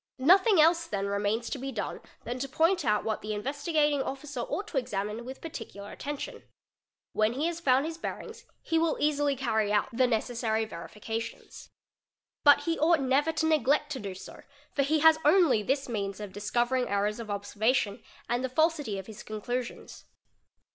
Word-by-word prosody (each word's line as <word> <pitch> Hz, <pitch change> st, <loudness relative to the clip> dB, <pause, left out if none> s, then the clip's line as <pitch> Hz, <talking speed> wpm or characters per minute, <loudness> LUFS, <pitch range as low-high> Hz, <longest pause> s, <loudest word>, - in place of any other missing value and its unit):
Nothing 375 Hz, -, +5 dB
else 335 Hz, +2 st, +4 dB
then 200 Hz, -6 st, -2 dB
remains 205 Hz, +3 st, -1 dB
to 275 Hz, -, -3 dB
be 270 Hz, +1 st, -4 dB
done 220 Hz, -5 st, -4 dB, 0.2 s
than 240 Hz, +2 st, -4 dB
_ -, -, -6 dB
to 275 Hz, -, -3 dB
point 335 Hz, +5 st, +2 dB
out 210 Hz, -4 st, +2 dB
what 220 Hz, -1 st, -2 dB
the 215 Hz, 0 st, -3 dB
Investigating 290 Hz, +5 st, 0 dB
Officer 275 Hz, 0 st, -5 dB
ought 400 Hz, -, -3 dB
to 285 Hz, -, +1 dB
examine 210 Hz, -1 st, -4 dB
with 260 Hz, +1 st, -8 dB
parti 315 Hz, -8 st, -6 dB
cular 200 Hz, 0 st, -10 dB
attention. 290 Hz, 0 st, -6 dB, 0.7 s
When 215 Hz, +1 st, +2 dB
he 280 Hz, +5 st, -1 dB
has 340 Hz, 0 st, -2 dB
found 270 Hz, -3 st, +3 dB
his 325 Hz, +1 st, -5 dB
bearings -, -, -6 dB, 0.2 s
he 325 Hz, -, +1 dB
will 325 Hz, -1 st, +1 dB
easily 290 Hz, -1 st, +2 dB
carry 220 Hz, -5 st, 0 dB
out 210 Hz, -1 st, +2 dB
the 255 Hz, +1 st, +4 dB
necessary 225 Hz, -1 st, 0 dB
verifications. 220 Hz, +4 st, -7 dB, 0.7 s
But 290 Hz, -1 st, +7 dB
he 330 Hz, +3 st, -1 dB
ought 325 Hz, +1 st, +4 dB
never 275 Hz, +4 st, +2 dB
to 320 Hz, 0 st, -1 dB
neglect 300 Hz, -1 st, +2 dB
to 270 Hz, -, -3 dB
do 200 Hz, -4 st, -6 dB
so, 185 Hz, -, -11 dB, 0.3 s
for 280 Hz, -, +1 dB
he 300 Hz, +2 st, +2 dB
has 320 Hz, 0 st, +7 dB
only 300 Hz, -, +5 dB
this 270 Hz, +6 st, -1 dB
means 200 Hz, -4 st, -3 dB
of 205 Hz, -3 st, -7 dB
discovering 240 Hz, +5 st, 0 dB
errors 205 Hz, +2 st, 0 dB
of 225 Hz, -2 st, -7 dB
observation 205 Hz, +1 st, 0 dB, 0.3 s
and 240 Hz, +1 st, 0 dB
the 260 Hz, -, -1 dB
fal 315 Hz, +6 st, +3 dB
sity 290 Hz, -11 st, -5 dB
of 190 Hz, -, -6 dB
his 220 Hz, 0 st, -10 dB
conclusions. 240 Hz, +3 st, -5 dB
255 Hz, 185 wpm, -29 LUFS, 215-300 Hz, 0.7 s, But